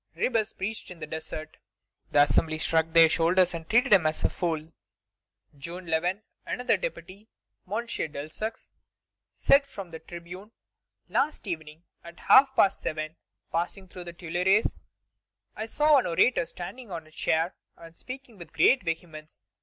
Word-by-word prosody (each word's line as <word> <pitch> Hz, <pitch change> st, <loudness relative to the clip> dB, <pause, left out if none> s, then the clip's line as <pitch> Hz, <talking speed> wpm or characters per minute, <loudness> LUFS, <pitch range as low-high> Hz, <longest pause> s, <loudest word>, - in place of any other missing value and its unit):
Ribes 220 Hz, -3 st, 0 dB
preached 215 Hz, +3 st, -5 dB
in 180 Hz, -, -9 dB
the 155 Hz, -, -5 dB
desert. 155 Hz, 0 st, -7 dB, 0.5 s
The 145 Hz, -, +6 dB
Assembly 155 Hz, +2 st, +1 dB
shrugged 160 Hz, +1 st, +1 dB
their 165 Hz, -1 st, +9 dB
shoulders 175 Hz, +3 st, +3 dB
and 165 Hz, -1 st, -7 dB
treated 240 Hz, +1 st, +4 dB
him 175 Hz, -5 st, +6 dB
as 155 Hz, -, -2 dB
a -, -, +3 dB
fool. 160 Hz, -2 st, -3 dB, 0.8 s
June 170 Hz, +6 st, -8 dB
11, 175 Hz, +5 st, 0 dB, 0.2 s
another 250 Hz, +1 st, +1 dB
deputy, 215 Hz, -, -6 dB, 0.4 s
M. 230 Hz, +3 st, -1 dB
Delsaux, 155 Hz, +2 st, -5 dB, 0.6 s
said 280 Hz, 0 st, +4 dB
from 195 Hz, -9 st, -9 dB
the 160 Hz, -, -7 dB
tribune: 175 Hz, +6 st, -10 dB, 0.5 s
"Last 285 Hz, -1 st, 0 dB
evening, 160 Hz, -3 st, -6 dB, 0.2 s
at 170 Hz, 0 st, -12 dB
half 265 Hz, 0 st, +6 dB
past 195 Hz, -, +4 dB
seven, 155 Hz, +1 st, -3 dB, 0.4 s
passing 175 Hz, +3 st, -3 dB
through 180 Hz, -1 st, -10 dB
the 175 Hz, -, -8 dB
Tuileries, 180 Hz, +5 st, +1 dB, 0.7 s
I 220 Hz, -, -4 dB
saw 300 Hz, +4 st, +4 dB
an -, -, -2 dB
orator 170 Hz, +2 st, +3 dB
standing 225 Hz, +7 st, -8 dB
on 165 Hz, -3 st, -6 dB
a 155 Hz, -, -19 dB
chair 160 Hz, +2 st, 0 dB, 0.2 s
and 165 Hz, 0 st, -13 dB
speaking 255 Hz, -3 st, -10 dB
with 165 Hz, -3 st, -11 dB
great 265 Hz, -, +5 dB
vehemence. 160 Hz, -, -6 dB
175 Hz, 150 wpm, -27 LUFS, 160-215 Hz, 0.8 s, their